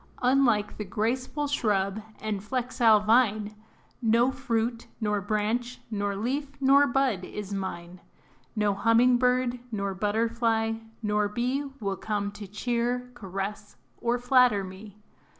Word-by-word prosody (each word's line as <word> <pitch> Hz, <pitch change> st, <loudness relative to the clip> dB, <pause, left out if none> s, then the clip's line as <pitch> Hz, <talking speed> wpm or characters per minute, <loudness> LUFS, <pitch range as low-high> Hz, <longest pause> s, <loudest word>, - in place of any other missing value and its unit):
Unlike 245 Hz, -5 st, +3 dB
the 210 Hz, -, -3 dB
graceful 245 Hz, +8 st, -2 dB
shrub 210 Hz, -7 st, 0 dB, 0.2 s
and 210 Hz, -2 st, -3 dB
flexile 235 Hz, -2 st, +3 dB
vine, 215 Hz, -2 st, +3 dB, 0.5 s
No 235 Hz, +2 st, +3 dB
fruit, 235 Hz, -3 st, -2 dB
nor 210 Hz, -2 st, 0 dB
branch, 220 Hz, +4 st, -1 dB
nor 205 Hz, -1 st, -1 dB
leaf, 275 Hz, +7 st, -3 dB
nor 275 Hz, +1 st, +5 dB
bud 250 Hz, -7 st, +1 dB
is 200 Hz, +2 st, -6 dB
mine. 180 Hz, -2 st, -5 dB, 0.5 s
No 210 Hz, -2 st, +2 dB
humming 230 Hz, +4 st, +4 dB
bird, 250 Hz, 0 st, +1 dB
nor 200 Hz, -2 st, -2 dB
butterfly, 225 Hz, +2 st, 0 dB, 0.3 s
nor 210 Hz, 0 st, +1 dB
bee 250 Hz, +6 st, -1 dB
Will 195 Hz, -2 st, -2 dB
come 205 Hz, -1 st, -2 dB
to 200 Hz, 0 st, -9 dB
cheer, 240 Hz, +4 st, -2 dB
caress 200 Hz, -1 st, -6 dB, 0.2 s
or 240 Hz, +1 st, +1 dB
flatter 245 Hz, -4 st, +4 dB
me. 190 Hz, +2 st, -10 dB
225 Hz, 125 wpm, -27 LUFS, 205-245 Hz, 0.5 s, nor